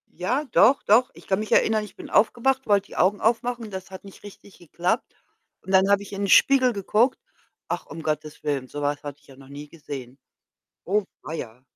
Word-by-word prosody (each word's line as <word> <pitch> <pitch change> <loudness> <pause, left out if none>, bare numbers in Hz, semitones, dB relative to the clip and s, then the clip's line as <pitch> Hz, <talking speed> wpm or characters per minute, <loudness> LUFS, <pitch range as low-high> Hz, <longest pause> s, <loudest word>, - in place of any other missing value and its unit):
Ja, 240 - -1
doch, 245 +7 +5
doch. 235 +5 +4
Ich - - -15
kann 190 +1 +1
mich 215 - -5
erinnern, 215 -1 +3
ich 210 - -12
bin - - -11
aufgewacht, 260 +4 +2
wollte 200 -2 +3
die - - -13
Augen 190 +4 +2
aufmachen, 235 -1 -1
das 190 0 -7
hat 190 - -10
nicht 195 - -14
richtig 205 -1 -14
geklappt, 175 +6 -2 0.5
und 190 - -8
dann 190 +1 +5
habe 200 0 +3
ich 200 - -12
in 200 - -4
den 200 - 0
Spiegel 260 -2 +5
geguckt 215 +5 +1 0.5
ach, - - -3
um 160 0 -9
Gottes 155 0 -4
Willen, 140 -3 -2
so 145 +2 -7
was 145 0 -1
hatte 145 -1 -7
ich - - -27
ja 135 - -15
noch 135 -1 -15
nie 145 +1 -9
gesehen. 135 -5 -9 0.7
Oh 205 +3 +1 0.2
weia.. 125 -5 -7
195 Hz, 210 wpm, -24 LUFS, 150-220 Hz, 0.7 s, doch